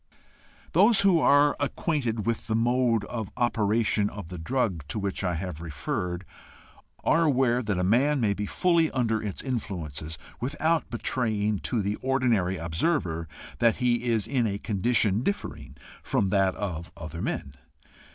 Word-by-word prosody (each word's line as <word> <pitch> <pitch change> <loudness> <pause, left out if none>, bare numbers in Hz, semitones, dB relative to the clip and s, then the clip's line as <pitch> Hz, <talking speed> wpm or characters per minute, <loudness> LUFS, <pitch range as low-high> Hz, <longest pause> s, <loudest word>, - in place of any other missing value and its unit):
Those 200 +5 +5
who 190 -4 +5
are 145 -1 +5
acquainted 135 -6 -1
with 115 -1 -2
the 110 - 0
mode 120 -1 +2
of 110 -3 -5
operation 110 -3 +2
of 100 -5 -8
the 90 -1 -7
drug 95 - -1
to 70 - -4
which 100 -1 -2
I 90 -2 0
have 85 -2 -5
referred, 90 - -3 0.8
are 165 +1 +3
aware 130 -4 +2
that 105 -5 -1
a 90 - 0
man 135 +9 +3
may 105 -4 +2
be 105 +1 -4
fully 170 - +2
under 115 -4 0
its 105 -3 -4
influences 80 - -4 0.2
without 155 +5 0
betraying 110 -4 0
to 115 -4 0
the 100 +2 -1
ordinary 120 -9 +1
observer 85 - -1 0.3
that 115 -2 +4
he 125 -1 +1
is 115 -4 +1
in 125 -5 +1
a 100 -1 -2
condition 105 0 +1
differing 75 - -4 0.2
from 95 - 0
that 95 -1 +2
of 85 -5 -4
other 85 +1 -7
men. 70 - -3
110 Hz, 150 wpm, -27 LUFS, 95-130 Hz, 0.8 s, Those